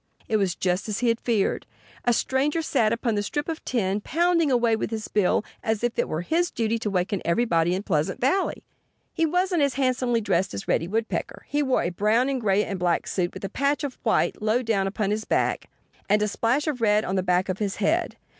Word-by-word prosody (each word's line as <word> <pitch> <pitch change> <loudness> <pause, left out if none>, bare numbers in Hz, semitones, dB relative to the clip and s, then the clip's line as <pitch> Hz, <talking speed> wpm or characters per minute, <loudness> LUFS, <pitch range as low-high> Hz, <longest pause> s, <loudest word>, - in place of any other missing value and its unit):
It 220 - +2
was 195 -4 0
just 185 +3 -1
as 210 - -1
he 245 -1 +1
had 230 0 +1
feared. 220 -5 0 0.4
A 245 - +4
stranger 280 +7 +1
sat 230 -8 +2
upon 230 0 0
the 205 - 0
strip 290 +8 -3
of 325 -1 -4
tin 205 -4 -1
pounding 335 +3 +2
away 235 -3 +3
with 220 - -3
his 220 -1 -4
bill 210 0 +1 0.2
as 220 0 -1
if 240 -1 -1
it - - +1
were 155 +2 -2
his 340 - +1
duty 230 0 -1
to 220 - -2
waken 190 +1 -1
everybody 170 -2 +2
in 190 - -3
Pleasant 155 -7 -1
Valley. 295 +10 0 0.5
He 330 -1 +1
wasn't 360 0 +1
as 280 -2 +1
handsomely 255 -3 +1
dressed 195 - 0
as 100 - -6
Reddy 165 - +1
Woodpecker. 220 +4 -3
He 290 - 0
wore 265 -3 +1
a 175 - -1
brown 215 +8 +2
and 265 -2 -1
gray 205 -1 +2
and 195 -2 -4
black 175 -1 +1
suit, 175 -2 -1
with 190 - -6
a - - -4
patch 280 +2 0
of 280 -3 -5
white 220 - +1
low 220 +4 +1
down 205 -4 +1
upon 200 +1 -1
his 215 +1 -1
back - - 0 0.4
and 210 +1 +4
a - - +1
splash 235 +7 0
of 290 -6 -2
red 210 -1 +3
on 190 - -2
the 190 - +2
back 180 0 +1
of 185 0 -3
his 205 -2 -1
head. 330 - 0
220 Hz, 230 wpm, -25 LUFS, 195-260 Hz, 0.5 s, A